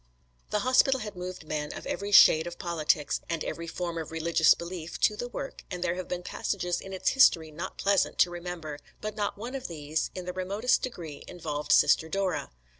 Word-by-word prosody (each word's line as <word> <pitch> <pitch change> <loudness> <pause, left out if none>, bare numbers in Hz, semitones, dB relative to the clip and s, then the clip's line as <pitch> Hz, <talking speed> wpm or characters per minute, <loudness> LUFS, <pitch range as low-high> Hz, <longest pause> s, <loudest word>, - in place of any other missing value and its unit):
The 210 - 0
hospital 260 +1 +4
had 210 -2 -6
moved 180 -2 -6
men 150 -1 -3
of - - -8
every 200 +1 -3
shade 160 -4 +8
of 175 - -7
politics, 155 -4 0
and 165 -2 -1
every 170 0 -5
form 170 0 -3
of 160 - -6
religious 165 0 +4
belief, 170 -1 -7
to 210 - +4
the 245 - -4
work, 270 +2 -7
and 180 -1 -4
there 170 - +1
have 185 0 -5
been 180 0 -4
passages 180 -2 -2
in 195 - -9
its 190 - 0
history 165 -12 +5
not 170 +5 -6
pleasant 200 -1 +2
to 175 - +4
remember, 170 -4 -6 0.2
but 215 0 -5
not 205 -2 -2
one 235 +5 -6
of 270 -2 -4
these 155 -1 -2
in 185 -1 -5
the 180 - -4
remotest 200 +7 +1
degree 165 - -6
involved 150 -4 -4
Sister 160 - +5
Dora. 195 +1 -1
175 Hz, 200 wpm, -28 LUFS, 160-200 Hz, 0.2 s, shade